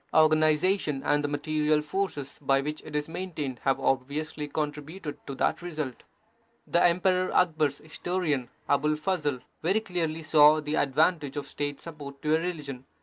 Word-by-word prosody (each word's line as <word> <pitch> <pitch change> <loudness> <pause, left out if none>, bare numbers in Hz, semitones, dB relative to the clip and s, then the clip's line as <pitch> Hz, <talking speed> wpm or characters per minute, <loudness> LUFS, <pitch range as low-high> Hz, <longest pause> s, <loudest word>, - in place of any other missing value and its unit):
Organization 155 0 +3
and 145 0 +2
the - - +1
material 150 +1 +1
forces 150 -4 -3
by 135 -1 +3
which 150 +2 -3
it 150 - -9
is 150 0 0
main 180 +2 -5
tained 140 -5 -4
have 135 - +1
obviously 145 +3 -1
contributed 150 +2 -4
to 135 - -4
that - - 0
result. 155 -7 -5 0.6
The 170 - +2
Emperor 185 +1 +3
Akbar 160 -4 +3
s 140 0 -7
historian, 155 -5 -2 0.2
Abul 150 +2 +2
Fazl, 150 -5 -1 0.2
very 190 +6 +2
clearly 165 -5 -2
saw 155 0 +6
the 150 0 -4
advantage 150 0 +2
of 145 - -3
State 145 -1 -4
support 145 -4 -9
to 155 +1 +3
a - - +2
religion. 150 -7 -5
150 Hz, 160 wpm, -28 LUFS, 145-165 Hz, 0.6 s, saw